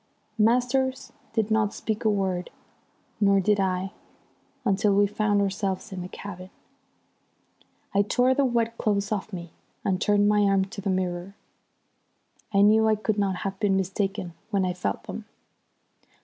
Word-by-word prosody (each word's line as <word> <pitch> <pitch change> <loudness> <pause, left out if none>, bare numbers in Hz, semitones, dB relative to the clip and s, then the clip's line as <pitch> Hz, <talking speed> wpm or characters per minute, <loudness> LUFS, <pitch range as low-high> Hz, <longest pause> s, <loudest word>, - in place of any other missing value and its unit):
Masters 255 +4 +1 0.2
did 225 -1 0
not 215 -1 +2
speak 220 +1 -3
a 220 - +3
word, 190 -3 -1 0.7
nor 200 -1 +4
did 205 +2 +2
I, 190 0 0 0.7
until 200 0 +2
we 205 0 +5
found 205 0 +1
ourselves 195 +1 -2
in 185 -1 -5
the 180 - -5
cabin. 185 -1 -9 1.4
I 200 - +4
tore 250 +5 +3
the 280 - +2
wet 230 -2 0
clothes 200 -1 0
off 215 0 -2
me 175 -3 -7 0.3
and 190 0 0
turned 205 -1 +3
my 210 0 +4
arm 195 -1 +3
to 200 +1 -8
the 200 - -2
mirror. 185 0 -2 1.2
I 200 -1 +4
knew 220 +2 +5
I 215 - +4
could 215 0 -1
not 195 -2 +1
have 195 0 -3
been 200 -3 +2
mistaken 190 -2 -2 0.2
when 200 -4 +1
I 180 - 0
felt 100 - -3
them. - - -7
200 Hz, 155 wpm, -26 LUFS, 190-215 Hz, 1.4 s, we